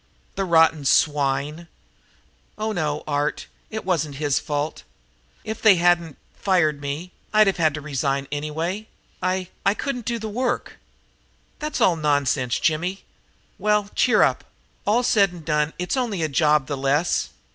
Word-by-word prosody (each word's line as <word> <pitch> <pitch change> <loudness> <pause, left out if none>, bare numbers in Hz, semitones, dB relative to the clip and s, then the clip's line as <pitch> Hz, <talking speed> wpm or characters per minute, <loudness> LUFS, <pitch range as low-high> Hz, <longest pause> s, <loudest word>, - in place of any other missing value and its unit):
"The 195 - -2
rotten 160 -3 +4
swine!" 145 +3 +1 0.9
"Oh 215 +1 -2
no, 155 -6 -2
Art, 145 0 -1 0.2
it 220 -2 -5
wasn't 160 -6 -1
his 145 -1 0
fault. 145 +1 -3 0.6
If 220 0 -5
they 215 -3 +7
hadn't 175 -3 +2 0.2
fired 155 -7 +1
me 145 +6 -5 0.2
I'd 215 -1 +6
have 195 - +1
had 155 -3 +2
to 155 - -5
resign 140 -1 -1
anyway. 160 +8 -3 0.3
I 185 0 -1
I 200 - +3
couldn't 250 -3 -4
do 235 - -1
the 220 -1 -5
work." 245 +4 -2 0.8
"That's 305 0 -3
all 180 - +5
nonsense, 145 -5 +1
Jimmy. 175 +4 -1 0.6
Well, 210 -1 +1
cheer 235 -4 +4
up. - - +1 0.4
All 230 +4 +3
said 200 -5 +3
and 170 -3 -11
done, 150 0 +1
it's 180 +6 -2
only 225 -10 -1
a - - +1
job 150 -1 +3
the 145 0 -4
less. 140 +5 +1
165 Hz, 150 wpm, -23 LUFS, 145-200 Hz, 0.9 s, they